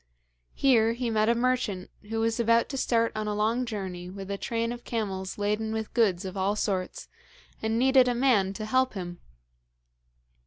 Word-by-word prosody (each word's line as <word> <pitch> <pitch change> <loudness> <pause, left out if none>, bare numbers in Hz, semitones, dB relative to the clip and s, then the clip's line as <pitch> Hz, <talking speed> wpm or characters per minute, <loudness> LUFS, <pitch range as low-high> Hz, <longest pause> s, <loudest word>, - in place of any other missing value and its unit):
Here 230 -4 +4
he 240 -1 -2
met 215 0 +2
a 235 - +4
merchant 240 -6 -1 0.2
who 225 0 -1
was 225 +1 0
about 230 0 +3
to 275 - -4
start 230 -3 +1
on 215 0 -3
a 210 - -1
long 225 +4 0
journey 185 -5 -5
with 195 +1 -7
a - - -1
train 230 0 -1
of 240 0 -7
camels 195 -5 -3
laden 210 +2 -1
with 220 -1 -4
goods 200 -6 +2
of 190 0 -6
all 195 +2 0
sorts, 190 -3 -2 0.5
and 220 +1 0
needed 260 +1 +5
a 245 - +1
man 235 -7 +3
to 215 +2 -5
help 255 +2 +1
him. 175 -2 -6
220 Hz, 185 wpm, -27 LUFS, 200-235 Hz, 0.5 s, needed